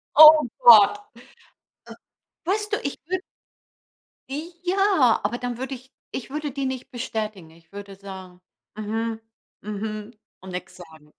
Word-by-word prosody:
Oh 310 0 +10 0.2
Gott. 225 - +8 0.9
Äh, - - -10 0.5
weißt 420 +4 -1
du, - - +3
ich 280 - -4
wür 370 +2 -2 1.1
I 315 +5 -5
ja, 365 - +3
aber 225 +4 -2
dann 245 -1 -4
würde 265 +2 -5
ich 260 +1 -11 0.2
ich 260 - -6
würde 300 +1 -4
die 275 +1 -3
nicht 260 +1 -6
bestätigen. 215 -8 -5
Ich 165 0 -22
würde 200 -1 -9
sagen: 190 -2 -11 0.4
„Mhm. 225 +1 -3 0.4
Mhm“, 210 +1 -5 0.3
und 190 0 -10
nix 180 +1 -7
sagen. 160 -4 -15
230 Hz, 140 wpm, -24 LUFS, 200-285 Hz, 1.1 s, Oh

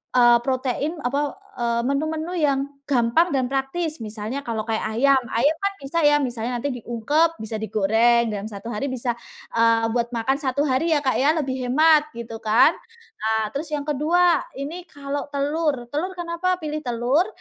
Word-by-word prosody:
eee, 240 -1 +7
protein 265 +4 -1
apa, 280 +3 -1 0.2
eee, 235 0 +1
menu-menu 315 +4 -1
yang 280 -3 +2 0.3
gampang 260 +6 +3
dan 270 -5 +1
praktis. 275 +4 -2
Misalnya 220 +4 -5
kalau 225 -5 -3
kayak 220 -1 -1 0.2
ayam, 275 +1 +4
ayam 275 +9 +2
kan 395 0 0
bisa 280 +3 -2
ya 295 -1 +5
misalnya 245 -3 -2
nanti 275 +3 -2
diungkep, 295 +9 +1
bisa 220 0 -5
digoreng 225 +2 +2
dalam 205 +1 -4
1 210 +3 -7
hari 245 +7 -2
bisa, 250 -1 -2 0.4
eee, 230 0 +3
buat 235 -1 0
makan 250 +4 -1
1 280 +1 0
hari 280 +4 +1
ya 310 - +4
Kak, 260 - +3
ya 275 +3 +2
lebih 260 -4 -2
hemat 305 +2 +5
gitu 230 -1 -7
kan. 225 +9 +5 0.5
Nah, 220 0 0
terus 295 +3 -4
yang 295 -2 -3
kedua, 320 +3 +3 0.2
ini 330 +6 -6
kalau 285 0 -5
telur, 285 -2 -1
telur 340 +6 -1
kenapa 350 +1 -1
pilih 305 -2 -4
telur? 250 - +1
270 Hz, 170 wpm, -23 LUFS, 235-305 Hz, 0.5 s, eee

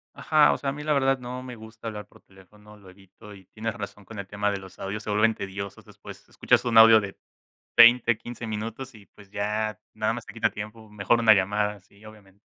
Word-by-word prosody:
Ajá, 155 -2 +3
o - - -3
sea, 140 - -2
a - - -3
mí 150 +1 -8
la 150 - +1
verdad, 135 -1 +2
no 125 0 -7
me 125 -1 -9
gusta 110 0 -11
hablar 105 -1 -6
por - - -21
teléfono, 105 +3 -19
lo 100 -2 -18
evito 100 +2 -16
y 95 -2 -15
tienes 110 +3 -5
razón 105 -2 -9
con 110 -1 -10
el 100 - -7
tema 105 +1 -1
de 100 - -3
los 95 -1 -14
audios, 100 +2 -5
se 105 - -8
vuelven 105 +2 +3
tediosos, 100 0 -7
después - - -14
escuchas - - +1
un 115 -2 +1
audio 110 0 +9
de 100 -1 -8 0.6
20, 120 0 +6
15 120 +1 -9
minutos 115 +4 -6
y, 105 - -15
pues, 100 +1 -19
ya 105 +1 -2
nada 110 +1 -1
más 120 -1 -7
te - - -11
quita 115 - 0
tiempo, 110 +1 -9
mejor 105 +3 0
una 110 -2 +7
llamada, 105 +1 -1
sí, 100 +2 -25
obviamente. 100 -2 -17
105 Hz, 230 wpm, -25 LUFS, 100-115 Hz, 0.6 s, audio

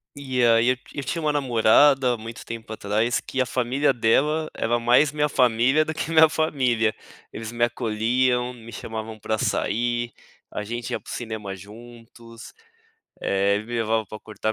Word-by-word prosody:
E 130 -3 -1
aí, 115 +1 +4
eu 130 - +3 0.2
eu 145 - -2
tinha 165 +5 -3
uma 150 -1 +1
namorada 130 -1 +4
muito 115 +1 -9
tempo 115 -1 -8
atrás 110 +2 0
que 135 - -4
a 130 - +2
família 130 +3 +1
dela 150 +7 +1
era 120 +1 0
mais 125 +5 +4
a - - -18
minha 150 0 +1
família 125 +4 +3
do 160 - -3
que 160 - -4
a - - -3
minha 160 0 +7
família, 125 -8 +1 0.4
eles 110 0 -6
me 120 0 +1
acolhiam, 120 +2 0
me 115 -2 -12
chamavam 110 -1 -7
pra 110 +1 -2
sair, 120 +2 -1 0.4
a 105 - -4
gente 120 +2 -5
ia - - -2
para - - -19
o - - -6
cinema 110 -4 -5
juntos, 115 +3 -13 0.7
eh, 100 +1 +1
eles 105 - -5
me 120 - -6
levavam 110 -2 0
pra 110 +3 -9
cortar 110 0 -4
120 Hz, 180 wpm, -24 LUFS, 110-130 Hz, 0.7 s, minha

